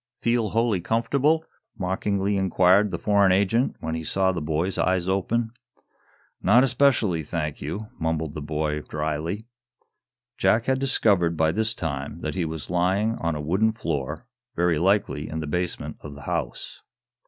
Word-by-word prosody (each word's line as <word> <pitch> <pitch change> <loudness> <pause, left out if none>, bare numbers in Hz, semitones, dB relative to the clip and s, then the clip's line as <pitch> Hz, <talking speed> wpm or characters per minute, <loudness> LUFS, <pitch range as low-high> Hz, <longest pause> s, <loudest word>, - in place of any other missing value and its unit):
"Feel 115 -2 +1
wholly 115 -4 +1
comfortable?" 140 - +1 0.3
mockingly 100 +1 -1
inquired 95 +1 +4
the - - -3
foreign 100 -2 +3
agent, 100 +7 +2
when 80 - -3
he 80 0 -3
saw 95 +4 +1
the 90 -3 -3
boy's 80 +5 -1
eyes 90 -1 +1
open. 110 +5 0 0.9
"Not 120 +6 +5
especially, 120 - +2
thank 75 -1 -4
you," 80 +9 -4 0.2
mumbled 80 -2 -1
the 75 - -5
boy, 75 0 -2
dryly. 80 +8 -3 0.9
Jack 110 +1 +3
had 130 0 +1
discovered, 100 -11 +2
by 80 0 +3
this 110 +5 0
time, 75 -3 -4
that - - -3
he 90 -3 -1
was 80 -1 -5
lying 95 +5 +2
on 85 -1 -1
a 75 - -4
wooden 95 +9 +1
floor, 75 - -3 0.3
very 85 -2 +2
likely 95 -5 +1
in 80 - -4
the 80 - -3
basement 90 +4 -3
of 75 -1 -9
the 70 - -11
house. - - -4
90 Hz, 155 wpm, -25 LUFS, 80-110 Hz, 0.9 s, Not